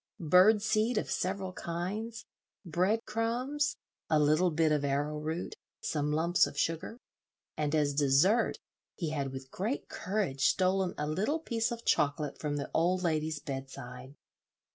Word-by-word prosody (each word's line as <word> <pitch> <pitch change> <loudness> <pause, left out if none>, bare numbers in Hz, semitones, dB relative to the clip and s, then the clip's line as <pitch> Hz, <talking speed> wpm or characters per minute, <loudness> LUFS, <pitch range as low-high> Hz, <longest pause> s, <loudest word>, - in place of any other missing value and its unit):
Bird 205 +3 +7
seed 225 +1 +1
of - - -1
several 190 0 -2
kinds, 200 +7 -4 0.4
bread 185 +7 +1
crumbs, 250 +7 -1 0.3
a 155 - +4
little 155 +5 +4
bit 160 -1 +2
of 150 -1 +1
arrowroot, 150 +4 -2 0.3
some 150 -1 -1
lumps 170 +4 +3
of - - -9
sugar, 165 +9 -1 0.6
and 150 0 0
as 145 -2 +2
dessert 145 - +3 0.4
he 165 -5 -3
had 140 -3 -2
with 130 0 -8
great 220 +9 -3
courage 175 -8 -2
stolen 185 0 +1
a 150 - -1
little 200 - 0
piece 235 -8 -1
of 235 -1 -6
chocolate 145 0 +1
from 150 -1 -2
the 140 -1 -4
old 180 +3 +2
lady's 155 -2 0
bedside. 135 -1 -7
170 Hz, 140 wpm, -31 LUFS, 150-210 Hz, 0.6 s, Bird